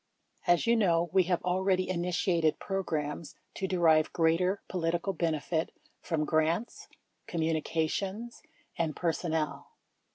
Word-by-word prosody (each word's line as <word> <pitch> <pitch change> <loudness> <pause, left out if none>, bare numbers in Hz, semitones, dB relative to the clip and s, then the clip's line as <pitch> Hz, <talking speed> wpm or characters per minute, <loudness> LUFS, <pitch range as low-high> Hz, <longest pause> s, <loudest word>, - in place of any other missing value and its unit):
As 175 -1 +4
you 235 0 +4
know, 170 -6 +2
we 190 -2 +5
have 175 -1 0
already 185 +1 +1
initiated 170 -2 +1
programs 160 -5 -3 0.2
to 190 - -3
derive 165 -4 +3
greater 175 +4 +2
political 175 +2 -1
benefit 160 -1 -1 0.3
from 155 -3 -1
grants, 160 +9 0 0.4
co 170 - -5
m - - +1
mu 165 +1 +1
ni 155 - 0
cations, 195 +9 -2 0.3
and 160 -3 -1
personnel. 160 -3 -1
170 Hz, 130 wpm, -30 LUFS, 160-185 Hz, 0.4 s, we